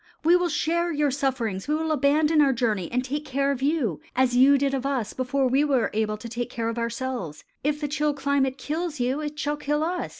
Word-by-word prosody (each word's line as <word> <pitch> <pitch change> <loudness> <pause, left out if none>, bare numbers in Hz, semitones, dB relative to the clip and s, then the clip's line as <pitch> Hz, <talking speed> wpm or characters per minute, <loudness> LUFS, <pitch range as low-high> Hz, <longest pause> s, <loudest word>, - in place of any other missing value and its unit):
We 335 +3 +5
will 355 -1 +2
share 340 +2 0
your 295 -2 +1
sufferings; 250 -8 -2
we 300 - +1
will 320 0 -1
abandon 300 +2 +3
our 275 -2 +4
journey 215 -7 -1
and 250 +1 0
take 290 +3 -3
care 275 0 0
of 265 -2 -3
you 275 - 0
as 250 -1 +2
you 270 +3 +6
did 275 0 0
of 265 -2 -1
us 265 -6 -2
before 260 +1 0
we 265 +3 +3
were 270 -5 +1
able 215 0 0
to 235 - -8
take 240 +1 -4
care 230 -2 -2
of 230 +1 -3
ourselves. 235 - -4 0.2
If 295 +1 0
the 295 - -2
chill 295 0 0
climate 275 -1 0
kills 315 0 -3
you, 255 +4 0
it 300 0 -5
shall 295 0 -1
kill 295 +1 -1
us. 350 +2 -2
275 Hz, 230 wpm, -25 LUFS, 245-295 Hz, 0.2 s, you